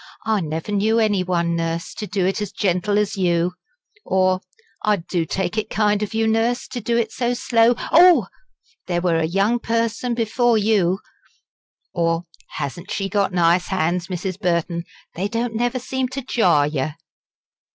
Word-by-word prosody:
"I 220 -1 +2
never 160 +4 -4
knew 210 +2 +2
any 210 -4 +2
one, 170 -2 0
Nurse, 165 0 -3
do 200 -3 -2
it 195 +3 0
as 205 -2 -3
gentle 200 +1 0
as 210 0 0
you 175 -1 +1 0.3
" 415 -3 -36
or 185 0 +2 0.4
"I 210 0 +3
do 170 -2 -2
take 190 +5 -1
it 215 - -4
kind 210 -1 +1
of 210 +1 -3
you, 225 0 +2
Nurse, 225 +2 +1
to 245 - -5
do 235 +2 0
it 225 -2 0
so 245 0 -1
slow 235 0 +3 0.2
oh! 355 +1 +7 0.6
there 175 -1 0
were 170 -2 +2
a 160 - +1
young 200 +7 +1
person 230 +1 -1
before 230 +1 +2
you 200 -4 +2 0.4
" - - -56
or 165 -1 0 0.3
"hasn't 170 +6 -5
she 195 -1 -2
got 200 0 +1
nice 175 0 +3
hands, 180 -1 0
Mrs. 185 0 -4
Burton? 170 -2 -1 0.3
they 190 +4 -2
don't 230 +2 -2
never 245 +3 0
seem 260 +1 -2
to 260 +1 -6
jar 180 - +3
yer." 145 0 -2
200 Hz, 170 wpm, -21 LUFS, 175-225 Hz, 0.6 s, oh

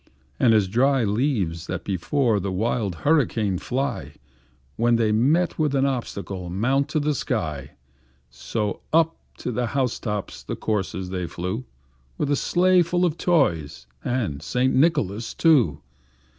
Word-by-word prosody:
As 110 -5 +4
dry 130 +5 +2
leaves 100 - 0
that - - -4
before 105 - +1
the 95 0 -3
wild 105 -1 -1
hurricane 115 - +2
fly, 125 - -3 0.6
When 120 +1 +3
they 115 -2 +2
meet 150 +13 +2
with 150 -3 +1
an 135 0 +3
obstacle, 100 -8 -3
mount 130 - +1
to 155 - 0
the 150 +1 +1
sky, 80 - -3 0.6
So, 105 - -3
up 165 +1 +3 0.2
to - - -4
the 120 0 -1
house 130 -3 0
top 105 -3 -3
the - - -6
coursers 95 -3 -2
they 90 -2 -3
flew, 90 +9 -4 0.5
With 145 - -1
a - - +4
sleigh 180 +5 +3
full 175 +1 +1
of 160 -3 0
toys 80 - +1 0.2
and 110 - -2
St. 130 +1 0
Nicholas 130 - +1
too. 125 - +3
115 Hz, 145 wpm, -24 LUFS, 95-140 Hz, 0.6 s, As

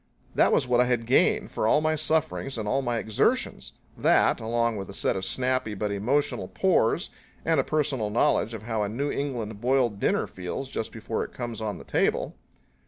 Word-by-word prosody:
That - - +4
was - - +2
what 125 0 +4
I - - +4
had 120 -2 0
gained 125 - +3
for 110 - 0
all 150 - +5
my 155 0 +1
sufferings 155 -3 -1
and 110 -2 -3
all 135 +6 +1
my 120 -3 -1
exertions 110 -2 0 0.2
that, - - +3
along 115 0 0
with 95 - -6
a 100 - -8
set - - 0
of 95 - -3
snappy 130 +1 0
but 105 +1 -2
emotional 125 +9 0
pores 175 -5 +1 0.3
and 165 -3 +3
a - - +3
personal 140 -8 0
knowledge 115 +1 +2
of 105 - -8
how 110 -1 -2
a 100 - -1
New 140 +7 -2
England 115 -7 -3
boiled 125 -4 +1
dinner - - +1
feels 95 +9 -6
just 110 - -4
before 110 0 -3
it - - -9
comes 120 -2 -5
on 105 -4 -3
the - - -10
table. - - 0
120 Hz, 200 wpm, -26 LUFS, 110-135 Hz, 0.3 s, all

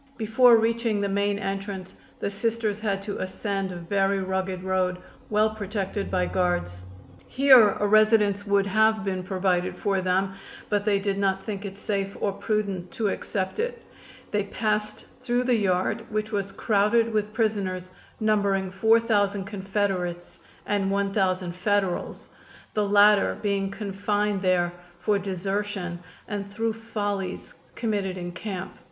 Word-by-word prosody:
Before 230 +2 +5
reaching 225 -1 +1
the 200 - 0
main 200 +1 +1
entrance 195 -1 -4 0.3
the 200 - -2
Sisters 215 0 -1
had 200 -2 -1
to 205 0 -4
ascend 195 0 -3
a - - -6
very 195 +3 0
rugged 190 -1 -2
road, 185 -1 0 0.3
well 215 +1 +3
protected 200 -1 -3
by 180 -1 +1
guards. 175 - -1 0.5
Here 260 -6 +6
a 210 - +1
residence 210 -1 +4
would 200 -1 +3
have 220 +1 +2
been 185 -1 -1
provided 185 -1 0
for 195 -3 0
them, 190 +1 +1 0.4
but 205 -1 0
they 205 -2 +3
did 195 0 -1
not 195 -1 +1
think 205 -1 -5
it 195 0 -7
safe 200 -1 -2
or 200 - 0
prudent 200 -3 -2
to 225 -6 0
accept 190 - -3
it. 480 +1 -2 0.5
They 205 -1 0
passed 210 0 -2 0.2
through 245 0 +1
the 250 0 +2
yard, 185 -4 +1
which 215 0 -2
was 200 -2 -2
crowded 220 +3 +2
with 210 -1 0
prisoners, 200 -5 -1 0.3
numbering 200 -3 +1
four 220 +4 +4
thousand 205 -3 +1
Confederates 195 -3 -2 0.3
and 200 -2 0
one 200 0 0
thousand 185 -3 +1
Federals, 195 -1 -1 0.4
the 210 -1 +1
latter 205 0 +5
being 200 -1 0
confined 205 0 -1
there 180 -2 +2 0.2
for 205 +3 +1
desertion 195 -1 -3 0.3
and 200 -1 -4
through 225 +2 -1
follies 205 -4 -4 0.2
committed 205 -5 -1
in 175 -1 -5
camp. 190 0 -6
200 Hz, 145 wpm, -26 LUFS, 190-215 Hz, 0.5 s, Here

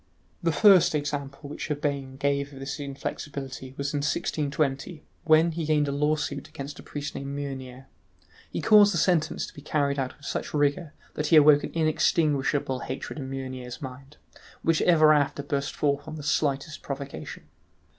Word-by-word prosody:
The 170 -2 +2
first 190 -3 +6
example 145 -1 -3
which 150 - -6
Urbain 140 -3 -2
gave 140 +1 0
of 135 - -10
this 135 +2 -5
inflexibility 135 -1 -6
was 140 +1 -2
in 145 - 0
1620, 145 +2 -1 0.2
when 160 +1 +5
he 165 +1 -3
gained 150 -2 +2
a - - -1
lawsuit 145 -1 -1
against 140 +1 -8
a - - -8
priest 145 -1 -6
named 140 - -5
Meunier. 135 -2 -6 0.6
He - - -4
caused 205 -3 +6
the - - +2
sentence 160 -2 +1
to - - -12
be 145 - -11
carried 140 -1 0
out 130 -1 -3
with 145 - -15
such - - -3
rigour 145 +2 0 0.2
that 150 - -2
he 165 - +5
awoke 150 -1 +7
an - - -4
inextinguishable 150 -4 +1
hatred 130 +4 -6
in 135 -1 -5
Meunier's 130 -1 -6
mind, 135 +1 -9 0.5
which 165 -1 +2
ever 155 -3 +6
after 145 -1 +1
burst 140 -1 -2
forth 140 -1 0
on 155 - -6
the 150 - -7
slightest 145 0 -1
provocation. 140 0 -6
145 Hz, 170 wpm, -27 LUFS, 140-155 Hz, 0.6 s, awoke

